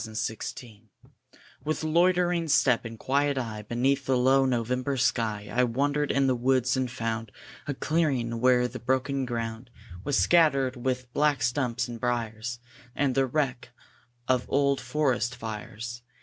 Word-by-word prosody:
IN 110 - -8
NOVEMBER 110 +1 -5 0.8
With 155 +1 -2
loitering 175 +1 +2
step 130 -5 +3
and 115 0 -7
quiet 140 +3 +1
eye, 115 -4 -3
Beneath 130 +5 0
the 130 -1 +3
low 135 +2 +4
November 125 +2 -1
sky, 110 -5 0
I 125 - +3
wandered 140 +4 0
in 140 0 +2
the 130 - +3
woods, 130 +1 +2
and 130 -1 -1
found 115 -3 -3 0.4
A 145 - -2
clearing, 130 -8 0
where 125 0 +4
the 125 +1 -8
broken 130 +2 0
ground 115 0 -4 0.3
Was 145 +3 0
scattered 140 -6 +3
with 125 0 -3
black 150 -1 +2
stumps 125 -1 0
and 120 -1 -7
briers, 120 0 -2 0.4
And 140 -2 +1
the 135 - +2
old 125 - -10
wreck 130 -5 -1 0.6
of 135 +2 +2
forest 125 -2 0
fires. 115 +1 -6
125 Hz, 150 wpm, -27 LUFS, 120-140 Hz, 0.8 s, low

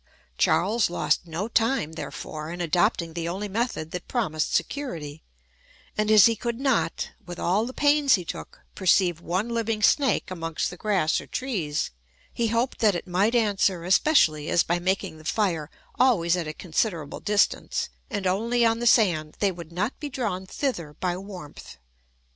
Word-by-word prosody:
Charles 195 - +2
lost 175 0 0
no 170 +6 -3
time, 230 - +1
therefore, 155 -1 -6
in 175 - -6
adopting 170 0 +1
the 170 0 -3
only 195 +4 -3
method 205 -6 -2
that 180 - -6
promised 155 - -1
security; 160 - -3 0.7
and 215 0 0
as 215 -2 +8
he 230 - +4
could 235 +2 -4
not 270 -3 0
(with 175 -2 -8
all 200 +7 +1
the - - -5
pains 290 0 +4
he 180 -3 -5
took) - - -8
perceive 180 -2 +2
one 185 +7 -1
living 225 -2 -1
snake 270 -7 +3
amongst 165 -2 -3
the - - -8
grass 190 -5 +1
or - - -13
trees, 185 - -2 0.4
he 235 - 0
hoped 230 +3 0
that 210 -4 +3
it 175 - -4
might 195 +6 +1
answer, 200 -6 +2
especially, 170 - +3
as 170 - +4
by 175 +1 0
making 185 -2 -2
the - - -14
fire 165 -4 0 0.3
always 180 -10 +4
at 175 -3 -3
a 155 - -4
considerable 165 -2 -2
distance, 210 0 +1 0.2
and 205 -6 -3
only 230 +6 +2
on 225 0 +2
the 240 - 0
sand, 170 -10 +3
they 200 -2 +2
would 170 -2 -10
not 205 +8 -2
be 295 - -5
drawn 210 -8 -3
thither 175 - -3
by 180 -1 -1
warmth. 185 -5 -10
190 Hz, 170 wpm, -25 LUFS, 170-230 Hz, 0.7 s, as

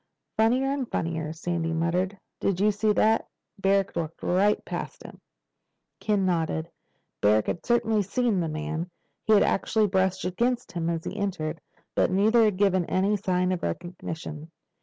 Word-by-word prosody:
"Funnier 230 +4 +3
and 275 -3 -2
funnier," 160 -2 -2
Sandy 165 0 -2
muttered. 180 +4 0 0.2
"Did 190 -2 0
you 210 +2 +4
see 210 +1 +1
that? 220 +2 +3 0.3
Barrack 195 0 +2
walked 165 -1 -4
right 200 +4 +2
past - - -5
him!" - - -12 0.8
Ken 205 -3 +1
nodded. 165 -2 -1 0.5
Barrack 105 +1 +4
had 170 - -3
certainly 225 -3 +2
seen 220 +1 0
the 165 -2 -1
man. 155 +3 -3 0.4
He 220 - +4
had 205 - +6
actually 215 +2 +2
brushed 190 -1 +1
against 235 +7 -1
him 170 -1 -2
as 165 -1 -2
he - - -5
entered. 170 -7 -3 0.3
But - - +2
neither 215 +5 +4
had 210 -3 +1
given 190 -3 +3
any 195 +5 +1
sign 185 -2 0
of 185 - -2
recognition. 160 - -5
185 Hz, 160 wpm, -26 LUFS, 165-210 Hz, 0.8 s, had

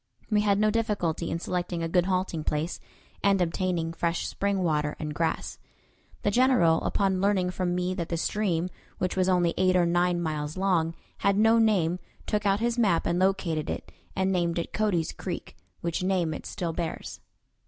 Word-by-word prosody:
We 210 -1 +4
had 200 -1 +3
no 215 +1 +3
difficulty 205 -7 -1
in 165 - -1
selecting 175 0 -2
a - - 0
good 180 +2 +2
halting 185 -4 -1
place, 150 +3 -1 0.4
and 200 -1 +4
obtaining 170 -1 0
fresh 170 0 -1
spring 200 -1 -1
water 150 -3 0
and 150 -1 -4
grass. 165 +1 -2 0.6
The 205 - +2
General, 240 -9 +4
upon 190 -2 +1
learning 195 -2 +2
from 180 -1 -1
me 180 +1 0
that 175 -3 -4
the 170 - -1
stream 180 -1 0 0.3
which 180 0 -1
was 185 0 +2
only 175 -2 +3
eight 185 0 +3
or 180 -1 +4
nine 175 +1 +2
miles 155 -1 -3
long 175 -4 +1 0.2
had 200 0 +2
no 225 +2 +5
name, 180 -6 +2 0.3
took 210 -1 0
out 195 +1 +3
his 240 +1 0
map 195 -8 +3
and 175 - +1
located 185 -5 +1
it, - - -5 0.2
and 190 0 +1
named 175 -2 0
it 170 - -3
Cody's 200 -7 +1
Creek, 180 -3 -6 0.3
which 170 0 -2
name 180 -4 +1
it - - -7
still 170 -2 -3
bears. 165 -1 -4
180 Hz, 185 wpm, -27 LUFS, 165-195 Hz, 0.6 s, no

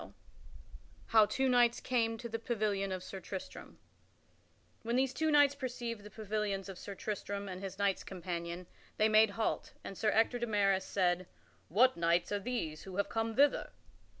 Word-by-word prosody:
[Sidenote: - - -12 0.9
How 220 -2 +7
two 265 +4 0
knights 240 -2 +4
came 230 -3 0
to 235 - -6
the 225 0 -4
pavilion 210 -4 -1
of 185 -1 -4
Sir 195 - -7
Tristram] 190 0 -8 1.0
When 235 +1 -2
these 260 0 +2
two 315 +3 0
knights 290 -2 +5
perceived 245 -5 -4
the 210 - -11
pavilions 210 -2 -3
of 190 - -8
Sir 200 - -7
Tristram 200 -1 -4
and 185 -1 -6
his 195 -1 -6
knights 200 -1 +1
companion, 175 -1 -5 0.3
they 215 - +4
made 215 0 +6
halt, 225 - -1
and 195 - -7
Sir 215 - +1
Ector 225 +3 +2
de 240 - -2
Maris 195 -3 +2
said, 180 -2 0 0.4
"What 250 +7 +4
knights 170 +2 +2
are 205 - 0
these 200 -9 -3
who 190 -1 -9
have 200 - 0
come 225 0 -1
hither?" 285 +1 +3
210 Hz, 175 wpm, -33 LUFS, 190-235 Hz, 1.0 s, How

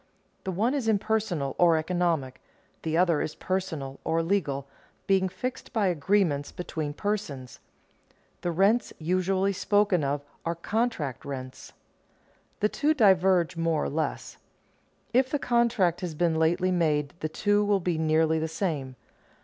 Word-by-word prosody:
The 190 - -1
one 220 +8 +1
is 270 -6 -1
impersonal 205 -9 0
or 170 -2 +5
economic; 160 -6 -1 0.4
the 160 0 -1
other 170 -3 +3
is 155 - -3
personal 160 -8 -3
or 165 0 +1
legal, 150 -7 -1 0.4
being 190 -1 +2
fixed 250 +7 -5
by 220 -4 +2
agreements 165 -3 +1
between 155 -4 -4
persons. 155 -12 -4 0.8
The 175 - -1
rents 195 +7 +2
usually 185 +4 +1
spoken 200 -3 +2
of 140 +1 -1 0.2
are 170 0 -2
contract 170 - -2
rents. 130 -2 -7 0.9
The 210 - +3
two 305 +6 +1
diverge 190 - +4
more 165 -2 0
or - - -1
less. 155 +2 -3 0.8
If 255 +1 +3
the 290 - 0
contract 235 - +1
has 175 -4 -4
been 170 +1 +2
lately 165 +3 +2
made 150 -5 +1
the 155 - -2
two 205 +5 +1
will 205 -1 +2
be 175 -3 -1
nearly 160 0 +2
the 160 - -1
same. 155 -6 -3
175 Hz, 140 wpm, -27 LUFS, 155-200 Hz, 0.9 s, or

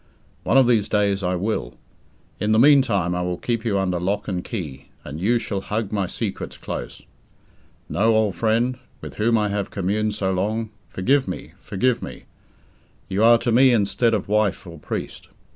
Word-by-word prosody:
One - - +2
of 135 - +7
these 115 -4 +2
days 100 -1 +1
I 90 0 0
will. 90 - -2 0.6
In 105 +1 +1
the - - +4
meantime, 115 - +4
I 90 - -1
will 90 0 -2
keep 115 -2 -2
you 105 -4 0
under 90 -2 0
lock 100 +4 -2
and 90 -2 -2
key, 75 - -6
and 75 +5 -7
you 115 +5 +3
shall 100 -4 -3
hug 105 0 -3
my 100 -3 0
secrets - - -5
close. - - -6 0.8
No, 110 +2 +2
old 110 -3 +2
friend, 115 +3 0 0.2
with - - -9
whom 115 +2 +3
I 105 -1 +1
have 100 -1 -2
communed 105 +2 -1
so 95 -2 -1
long, 110 +4 -1 0.2
forgive 130 +7 +1
me, 90 - -6
forgive 120 +5 0
me. - - -8 0.9
You 100 +3 +1
are 115 +1 +7
to 120 - -1
me 130 +3 +6
instead 115 +1 +2
of 105 - -3
wife 105 -2 +1
or 85 -3 -10
priest. - - -6
105 Hz, 180 wpm, -22 LUFS, 95-115 Hz, 0.9 s, of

